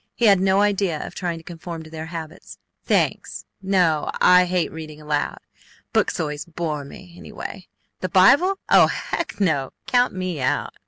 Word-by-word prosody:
He 240 - +1
had 200 -3 +6
no 190 +1 +3
idea 195 -6 0
of - - -9
trying 175 -2 -3
to 165 - -12
conform 165 -1 -8
to 155 - -13
their 160 0 -6
habits. 165 0 -8 0.3
"Thanks! - - -1 0.2
No! 180 -6 +1
I 180 0 +6
hate 180 -1 -1
reading 155 -1 -9
aloud. 150 -1 -2 0.6
Books - - +1
always 150 -2 -3
bore 160 -3 -4
me 175 +5 -12
anyway. 180 +1 -9 0.3
The 185 - -3
Bible! 285 - +5
Oh - - +6
Heck! - - -4
NO! 155 -9 0
Count 245 -3 +2
me 185 -5 -3
out!" 130 - -1
175 Hz, 165 wpm, -22 LUFS, 155-190 Hz, 0.6 s, had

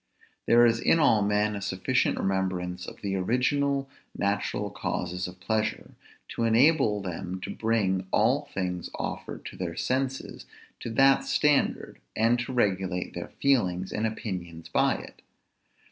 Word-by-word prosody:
There 120 +1 +6
is 115 -1 +3
in 165 - +3
all 115 -9 +4
men 105 +1 +1
a 100 - -5
sufficient 95 -1 0
remembrance 90 -2 -2
of - - -10
the 100 -1 -1
original 135 +7 +1 0.3
natural 100 0 -1
causes 90 +1 -3
of 90 0 -11
pleasure, 110 +2 -2 0.4
to 115 - -3
enable 115 -2 +3
them 90 0 -5
to - - -5
bring 100 -5 0
all 130 +7 +2
things 90 -2 -3
offered - - -5
to - - -7
their 85 -2 -4
senses 135 +5 -2 0.3
to - - -5
that 135 +3 +5
standard, 150 -2 +1 0.2
and 115 +2 +3
to 120 +2 -4
regulate 95 -6 0
their - - -6
feelings 95 -10 +1
and 110 +1 0
opinions 90 -7 -6
by - - +2
it. - - -10
105 Hz, 145 wpm, -27 LUFS, 95-120 Hz, 0.4 s, There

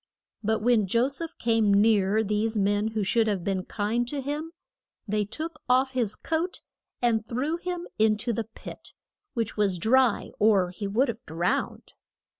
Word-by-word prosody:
But 220 0 0
when 230 -4 +3
Jo 235 +7 +2
seph 325 +4 -6
came 225 -3 +2
near 205 0 +4
these 215 +2 0
men 205 +1 +1
who 220 -1 -2
should 225 +3 +2
have 200 -5 -1
been 190 -1 -1
kind 225 +3 -1
to 285 +3 -3
him, 295 +4 -4 0.6
they 210 0 0
took 310 +8 -6
off 260 +2 +3
his 240 -5 -1
coat 330 +3 -2 0.4
and 225 -2 +2
threw 275 +8 -1
him 355 0 -4
in 215 -1 +4
to 235 +3 -2
the 230 0 -2
pit, 225 - -11 0.4
which 225 -3 -2
was 200 -3 +2
dry, 240 +5 +2
or 200 -4 +4
he 200 +2 -5
would 235 +8 +2
have 235 -1 -5
drowned. 170 +3 -2
220 Hz, 170 wpm, -27 LUFS, 205-255 Hz, 0.6 s, near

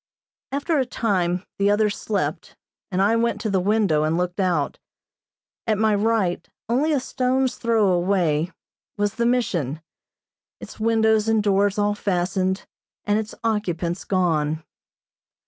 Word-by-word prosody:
After 285 +3 0
a 260 - +1
time 185 -7 0 0.2
the 200 0 +3
others 205 0 +2
slept 205 -2 -3 0.3
and 190 -1 +1
I 215 +3 +3
went 235 +1 +1
to 220 - -2
the 190 - +2
window 195 -5 +2
and 155 +2 +1
looked 180 +2 -2
out. 175 -7 0 0.9
At 215 -2 +2
my 215 0 +3
right, 205 -4 0 0.2
only 270 +7 +1
a 290 - +2
stone's 255 0 0
throw 225 -3 +2
away, 175 -3 +1 0.5
was 205 0 0
the 235 +1 0
Mission, 175 - 0 0.8
its - - -11
windows 220 -1 +2
and 220 -1 +2
doors 200 0 +2
all 205 0 +2
fastened, 190 -1 -1 0.4
and 210 +1 +2
its 220 0 -6
occupants 185 -6 -1
gone. 160 -4 0
205 Hz, 140 wpm, -23 LUFS, 180-225 Hz, 0.9 s, the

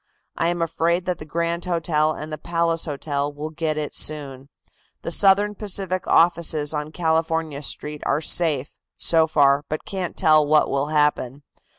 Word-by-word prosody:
I 165 - 0
am 175 0 0
afraid 170 +2 0
that 180 -2 -2
the 155 - -8
Grand 170 +2 -2
Hotel 160 -3 +1
and 155 0 -7
the 155 - -5
Palace 165 0 0
Hotel 145 -1 -3
will 150 +2 -7
get 155 -1 -2
it 150 -1 -4
soon. 140 -3 -1 0.5
The - - -4
Southern 200 +3 +4
Pacific 190 -3 -2
offices 165 -3 +2
on 150 0 -4
California 160 -2 -1
Street 150 0 -4
are - - +1
safe, 155 -3 0 0.2
so 160 -1 +2
far, 140 -2 +3
but 155 - -4
can't 185 -3 -5
tell 155 -1 +5
what 150 +1 +2
will 140 +1 0
happen. 150 -3 0
155 Hz, 165 wpm, -22 LUFS, 150-170 Hz, 0.5 s, tell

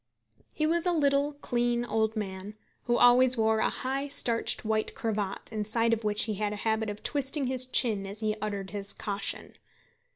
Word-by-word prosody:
He 310 - -1
was 335 +2 +1
a - - +3
little, 285 -2 +2
clean, 240 0 0
old 220 -1 0
man, 200 -1 -5 0.3
who 240 -1 +2
always 250 +1 +6
wore 220 0 +2
a - - +2
high 270 +2 -3
starched 235 -4 +1
white 215 0 -1
cravat, 210 -4 -3
inside 225 +1 0
which 210 0 +3
he 220 - -1
had 210 +1 -2
a 210 - -7
habit 220 -1 0
of 205 0 -7
twisting 280 0 0
his 255 0 0
chin 215 -6 +1
as 205 +3 -8
he 215 -1 0
uttered 200 -2 -4
his 200 -1 -1
caution. 200 -1 -4
225 Hz, 175 wpm, -28 LUFS, 210-255 Hz, 0.3 s, always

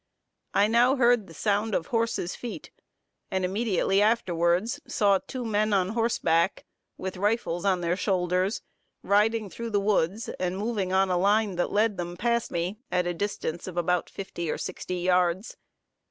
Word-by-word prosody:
I 200 - +5
now 240 +5 +4
heard 240 -5 +3
the 165 - -13
sound 210 +3 0
of 165 - -1
horses' 230 -6 0
feet, 240 -2 -7 0.6
and 190 -1 0
immediately 195 0 +1
afterwards 200 - +1
saw 200 -3 +3
two 250 +4 -6
men 215 -1 +1
on 185 -2 +2
horseback, 205 -6 +1 0.3
with 190 0 -5
rifles 200 -3 0
on 185 -2 +2
their 170 +1 0
shoulders, 185 +1 0 0.4
riding 215 +2 +2
through 230 +4 -6
the 205 -2 +1
woods, 200 0 0
and 185 0 -1
moving 205 -3 -2
on 190 0 +3
a 180 - +2
line 205 +1 +2
that 175 - 0
led 210 -1 +2
them 175 0 -5
past 235 +2 0
me, 175 +5 -3
at 180 -1 +1
a 175 - -1
distance 175 -3 -3
of 180 -2 -7
about 175 0 0
fifty 170 -4 -5
or - - -1
sixty 180 - -5
yards. 180 +2 +1
195 Hz, 165 wpm, -27 LUFS, 180-220 Hz, 0.6 s, I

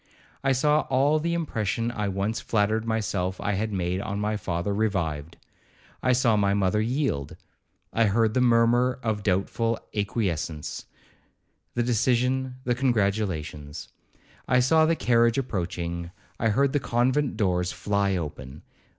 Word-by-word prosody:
I 135 - +2
saw 150 +3 +2
all 140 +4 +3
the 170 +2 -1
impression 115 - -1
I 105 -3 -2
once 100 +5 -2
flattered 110 0 0
myself 100 -5 -1
I 105 - -1
had 105 +2 -1
made 90 -1 -1
on 100 0 -3
my 105 +1 -1
father 90 -1 -2
revived. 85 -8 -2 0.6
I 130 - +2
saw 120 -3 +3
my 100 -1 +2
mother 100 +1 +1
yield. 120 - -1 0.6
I 115 - +3
heard 110 +1 +2
the 125 - +2
murmur 120 +1 +3
of 110 -2 -1
doubtful 105 +4 0 0.2
acquiescence,—the 100 +2 -5
decision, 125 +2 +1
the 125 - +1
congratulations. 100 - -1 0.6
I 125 - +4
saw 155 +5 +4
the 165 - +2
carriage 115 -4 +3
approaching,—I 90 -2 -3
heard 135 +5 +2
the 145 - +2
convent 130 +4 0
doors 90 -3 +1
fly 100 -1 0
open. 75 -4 -6
110 Hz, 135 wpm, -26 LUFS, 95-125 Hz, 0.6 s, I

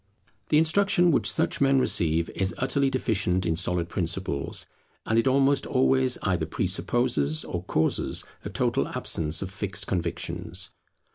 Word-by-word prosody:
The 150 - +4
instruction 175 +2 +3
which 145 - +3
such - - 0
men 135 0 +4
receive 85 -9 +2
is 95 0 -2
utterly 135 +1 +1
deficient 95 -8 0
in 85 -1 +1
solid 85 0 0
principles, 85 -5 -2 0.4
and 110 +1 +2
it 115 - +1
almost 135 +1 +3
always 130 -1 +2
either 90 -5 0
presupposes 90 - 0
or 90 0 -4
causes 80 - 0 0.2
a - - -5
total - - 0
absence 80 +2 0
of 95 - -7
fixed 95 0 -3
convictions. 85 -3 -3
95 Hz, 140 wpm, -26 LUFS, 85-130 Hz, 0.4 s, The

